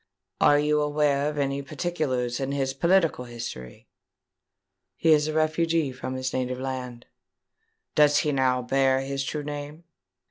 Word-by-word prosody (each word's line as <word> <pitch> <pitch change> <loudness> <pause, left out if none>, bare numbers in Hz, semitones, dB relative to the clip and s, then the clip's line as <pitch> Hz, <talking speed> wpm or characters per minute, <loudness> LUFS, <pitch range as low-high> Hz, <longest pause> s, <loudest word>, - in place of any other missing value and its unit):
"Are 145 - +5
you 150 +1 +2
aware 145 -1 +1
of 150 - -6
any 140 0 -1
particulars 140 -5 -2
in 135 0 -2
his 135 -1 -1
political 170 -3 +2
history?" 115 - -8 1.1
"He 165 - +2
is 150 -1 +4
a 155 - -2
refugee 155 -1 +1
from 130 0 -6
his 130 0 -3
native 125 0 -2
land." 130 -2 -5 0.9
"Does 145 -1 +5
he 150 - +2
now 130 -2 +1
bear 135 +1 +2
his 135 0 -3
true 150 +2 -4
name?" 145 +2 -7
140 Hz, 145 wpm, -26 LUFS, 130-150 Hz, 1.1 s, Are